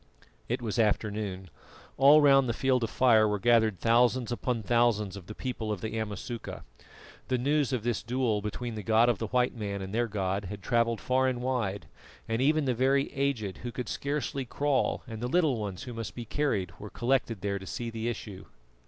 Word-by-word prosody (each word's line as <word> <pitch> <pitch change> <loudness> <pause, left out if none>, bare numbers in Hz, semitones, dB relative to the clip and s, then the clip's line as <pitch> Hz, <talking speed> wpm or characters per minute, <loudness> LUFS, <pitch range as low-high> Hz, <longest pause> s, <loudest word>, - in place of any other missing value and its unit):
It - - -1
was 115 +1 -2
afternoon. 105 -4 -1 0.4
All 145 +3 +7
round 135 -3 +5
the 115 - -1
Field 130 -2 +2
of 115 - -1
Fire 110 -4 +4
were 105 0 0
gathered 110 -2 +3
thousands 120 +1 +3
upon 120 -1 -2
thousands 110 -3 +2
of 95 -3 -10
the 110 - -8
people 115 -4 -4
of 105 - -3
the 110 0 -4
Amasuka. 110 +2 -5 0.6
The 130 - +1
news 140 +2 +1
of 125 -5 -1
this 120 -1 -1
duel 120 -3 0
between 115 +3 -4
the 110 - -5
God 110 +4 +4
of 120 - 0
the 115 - -2
white 125 +3 +1
man 100 -3 -4
and 95 +1 -6
their 120 +1 +1
god 100 -1 -2
had 100 +1 -7
travelled 115 -2 +1
far 130 +1 +2
and 125 -2 -1
wide, 110 - -1 0.4
and 115 +2 -1
even 155 +2 +3
the 130 - +1
very 135 +3 +1
aged 130 -8 -1
who 120 - -5
could 125 +1 -5
scarcely 140 -1 -2
crawl 140 +2 0
and 115 -3 -7
the 120 - -1
little 150 -4 +2
ones 100 -4 -5
who 125 - -7
must 115 -3 -6
be 120 - -6
carried 105 - -1
were 105 - -8
collected 120 -4 0
there 100 -1 -1
to 95 - -10
see 120 -1 -4
the 115 +1 -2
issue. 105 -4 -7
115 Hz, 205 wpm, -29 LUFS, 105-130 Hz, 0.6 s, All